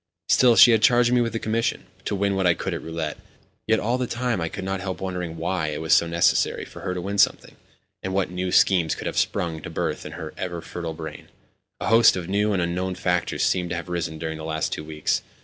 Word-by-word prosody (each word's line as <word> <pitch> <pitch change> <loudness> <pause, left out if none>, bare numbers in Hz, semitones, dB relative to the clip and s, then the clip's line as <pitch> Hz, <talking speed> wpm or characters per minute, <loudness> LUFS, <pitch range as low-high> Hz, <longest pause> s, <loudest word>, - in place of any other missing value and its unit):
Still, 125 -2 +5
she 120 - +9
had 110 -2 +3
charged 120 0 +4
me 125 - +4
with 115 -2 -1
a - - 0
commission—to 110 -2 -2
win 100 0 0
what 95 -1 +1
I 85 - +4
could - - -3
at - - -4
roulette. 80 -2 -4 0.5
Yet 110 0 +3
all 120 +4 0
the 125 - -1
time 120 -5 -1
I 80 - -1
could 95 - -6
not 95 0 -3
help 95 -1 -4
wondering 90 -3 -4
why 85 0 -1
it 75 -1 -3
was 80 0 +2
so 85 - +5
necessary 85 +1 +2
for - - -12
her 90 -1 -3
to 90 - -3
win 100 +3 -3
something, - - +2 0.5
and 95 - -4
what 95 -2 0
new 90 0 -2
schemes 90 -5 +3
could - - -8
have - - -3
sprung 80 -2 -1
to - - -7
birth - - -3
in - - -8
her 80 -1 -7
ever 90 -2 -3
fertile 85 -1 -6
brain. 80 -2 -8 0.5
A - - -2
host 115 0 +6
of 90 -2 -4
new 105 +2 +1
and 95 -3 +1
unknown 90 +2 -2
factors 90 -1 -1
seemed 90 -1 +1
to 85 - -2
have 85 +1 -5
arisen 80 -2 -3
during 80 0 -5
the - - -7
last 80 0 -2
two - - -5
weeks. 75 0 -1
90 Hz, 245 wpm, -24 LUFS, 80-100 Hz, 0.5 s, she